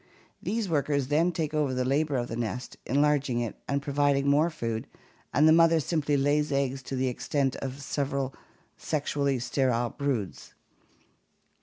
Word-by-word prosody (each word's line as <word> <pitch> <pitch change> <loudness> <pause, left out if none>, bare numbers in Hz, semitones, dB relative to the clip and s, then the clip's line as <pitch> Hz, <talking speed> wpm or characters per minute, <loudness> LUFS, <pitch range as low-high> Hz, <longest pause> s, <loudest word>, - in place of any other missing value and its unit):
These 225 -1 -1
workers 145 -4 0
then 165 +4 +3
take 160 -3 -3
over 145 -4 0
the 125 0 0
labor 145 +2 +1
of 120 -1 -2
the 115 - -5
nest, 120 +2 -4
enlarging 145 -2 +2
it 120 -3 -3
and 140 0 -1
providing 140 -1 +1
more 150 +4 +4
food, 115 -8 -4 0.4
and 150 +4 +4
the 160 - +7
mother 165 0 +5
simply 150 -2 0
lays 145 +2 +1
eggs 135 -1 0
to 135 - -5
the 130 0 0
extent 135 +1 -1
of 135 +1 -6
several 140 -1 -2 0.4
sexually 140 -2 -1
sterile 120 -1 0
broods. 135 -10 -3
140 Hz, 155 wpm, -28 LUFS, 130-150 Hz, 0.4 s, the